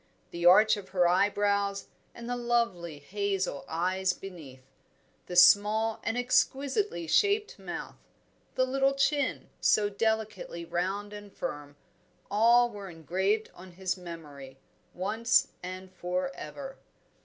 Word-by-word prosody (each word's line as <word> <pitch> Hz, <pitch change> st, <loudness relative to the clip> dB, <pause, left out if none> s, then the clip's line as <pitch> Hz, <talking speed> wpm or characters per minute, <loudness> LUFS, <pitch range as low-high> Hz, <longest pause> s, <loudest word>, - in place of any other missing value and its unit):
The 170 Hz, 0 st, +1 dB
arch 215 Hz, +4 st, +6 dB
of 200 Hz, -2 st, -9 dB
her 180 Hz, -2 st, +3 dB
eyebrows 200 Hz, +1 st, +1 dB, 0.3 s
and 235 Hz, 0 st, -9 dB
the 245 Hz, -, -2 dB
lovely 235 Hz, -10 st, -1 dB
hazel 190 Hz, 0 st, -2 dB
eyes 185 Hz, +3 st, 0 dB
beneath; 150 Hz, -11 st, -11 dB, 0.6 s
the 180 Hz, -, -6 dB
small 215 Hz, +4 st, +5 dB
and 225 Hz, +1 st, -2 dB
exquisitely 265 Hz, -, 0 dB
shaped 410 Hz, -, +1 dB
mouth; -, -, -7 dB, 0.6 s
the 255 Hz, -, +3 dB
little 270 Hz, +1 st, +1 dB
chin, 280 Hz, +1 st, 0 dB
so 205 Hz, -1 st, +3 dB
delicately 215 Hz, -5 st, -2 dB
round 195 Hz, +5 st, -3 dB
and 205 Hz, -1 st, -10 dB
firm; 145 Hz, -6 st, -6 dB, 0.6 s
all 235 Hz, +3 st, +5 dB
were 200 Hz, -2 st, -8 dB
engraved 190 Hz, +6 st, -1 dB
on 180 Hz, 0 st, -13 dB
his 185 Hz, 0 st, -2 dB
memory, 150 Hz, -7 st, -10 dB, 0.4 s
once 220 Hz, +6 st, +2 dB
and 185 Hz, +1 st, -8 dB
for 180 Hz, 0 st, -2 dB
ever. 270 Hz, -, -8 dB
195 Hz, 120 wpm, -29 LUFS, 175-225 Hz, 0.6 s, arch